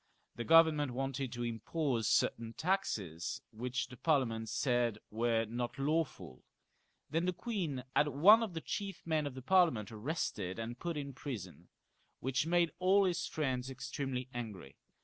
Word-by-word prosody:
The 120 - -3
Government 155 -3 +5
wanted 135 0 -2
to 120 0 -3
set 115 -2 -4
up 140 -8 0
certain 115 +2 +1
taxes, 110 - -2
which 125 +3 -2
the 125 - -12
Parliament 115 -7 +1
said 120 -4 +1
Were 115 +1 +1
not 120 +2 -4
lawful; 145 - -1 0.7
then 165 +3 +1
the 180 - +1
queen 175 - -3
had 150 - +4
one 180 - +7
of 210 -7 -3
the 160 - -3
chief 195 0 -5
men 155 -3 +1
of 135 - -7
the 130 - -8
Parliament 160 - +3
arrested 110 - -3
and 115 +2 -5
put 170 -2 -3
in 140 -1 -4
prison, 105 - -7 0.5
which 135 +3 0
made 170 -1 +3
all 190 +2 +5
his 175 -2 0
friends 130 -4 -2
extremely 130 0 -4
angry. 105 - -6
135 Hz, 155 wpm, -34 LUFS, 115-165 Hz, 0.7 s, one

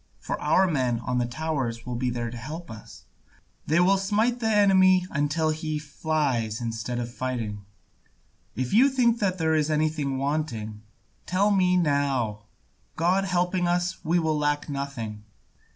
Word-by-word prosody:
For - - -5
our 160 +6 +4
men 130 -9 0
on 125 +1 -1
the 120 - 0
towers 130 -5 -3
will 125 - -4
be 125 +1 -1
there 120 -1 -3
to - - -8
help 150 +8 -7
us, 110 -1 -12 0.6
they 160 +3 +3
will 190 +2 +4
smite 215 +5 +1
the 225 - -1
enemy 190 -3 +5
until 145 +3 0
he 155 0 -3
flies 145 -7 -1
instead 115 +1 -4
of 120 0 -4
fighting. 115 -6 -4 0.9
If 130 0 -3
you 255 +6 +6
think 240 -3 +2
there 180 -5 +1
is 155 -1 +1
anything 150 -3 0
wanting, 130 -7 -3 0.5
tell 200 +3 +2
me 180 -2 +3
now; 135 -10 0 0.5
God 185 +4 +2
helping 180 -1 0
us, 175 +1 -1
we 170 +1 +2
will 160 -3 +1
lack 145 0 0
nothing. 140 -7 -5
150 Hz, 150 wpm, -26 LUFS, 125-180 Hz, 0.9 s, you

